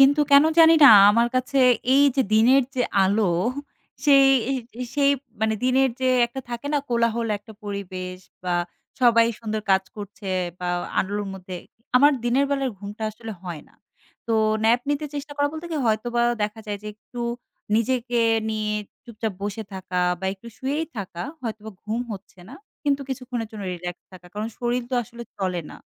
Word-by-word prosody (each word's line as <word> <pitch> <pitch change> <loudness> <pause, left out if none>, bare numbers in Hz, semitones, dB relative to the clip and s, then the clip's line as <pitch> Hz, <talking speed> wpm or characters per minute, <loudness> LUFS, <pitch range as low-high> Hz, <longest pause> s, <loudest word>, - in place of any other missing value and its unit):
কিন্তু 280 +2 +6
কেন 280 +1 +8
জানি 325 0 +8
না - - +11 0.2
আমার 235 +2 +3
কাছে 255 +2 0 0.4
এই 280 - +6
যে 270 - +4
দিনের 250 +5 +5
যে 250 - +1 0.2
আলো, 200 +3 +2 0.8
সেই, 275 -2 +6 0.6
সেই 280 -1 +4 0.3
মানে 220 0 +1
দিনের 260 +1 +3
যে 260 - +2 0.2
একটা 240 +3 -7
থাকে 240 +3 -5
না? 290 - +3
কোলাহল 235 -1 +1
একটা 220 +2 -14
পরিবেশ 185 -2 -5 0.3
বা 180 -1 0 0.5
সবাই 230 -2 +5
সুন্দর 220 -1 -3
কাজ 190 0 +4
করছে 205 -1 -8 0.3
বা 180 - -3 0.3
আলোর 205 +2 -1
মধ্যে, 185 -1 -8 0.4
আমার 290 +3 +6
দিনের 255 +4 +2
বেলায় 275 -2 0
ঘুমটা 205 +2 -8
আসলে 225 +1 -8
হয় 170 -5 -6
না। - - -27 0.5
তো 230 - -1 0.3
ন্যাপ 235 +2 +4
নিতে 290 +1 -1
চেষ্টা 290 +1 -5
করা 285 0 +2
বলতে 315 +2 -6
কি? 320 - -2
হয়তোবা 235 +2 +1 0.2
দেখা 210 +2 -3
যায় 205 -1 -3
যে - - -9
একটু 240 +3 -10 0.6
নিজেকে 240 +1 0 0.3
নিয়ে 215 -1 -2 0.3
চুপচাপ 220 -3 -4
বসে 205 +2 -3
থাকা 185 -1 -3 0.2
বা - - -6
একটু 195 +4 -17
শুয়েই 290 +5 -2
থাকা, 185 -4 -5 0.2
হয়তোবা 220 -2 -5
ঘুম 220 +3 -2
হচ্ছে 195 -1 -11
না। 260 - -10 0.3
কিন্তু 280 -1 +1
কিছুক্ষণের 250 -4 -4
জন্য 210 -2 -8
রিল্যাক্স 175 0 -7
থাকা। 180 -1 -13
কারণ 215 +2 -3
শরির 245 +1 -1
তো - - -1
আসলে 235 +1 -10 0.2
চলে 185 -2 -1
না - - -10
230 Hz, 170 wpm, -24 LUFS, 205-260 Hz, 0.8 s, না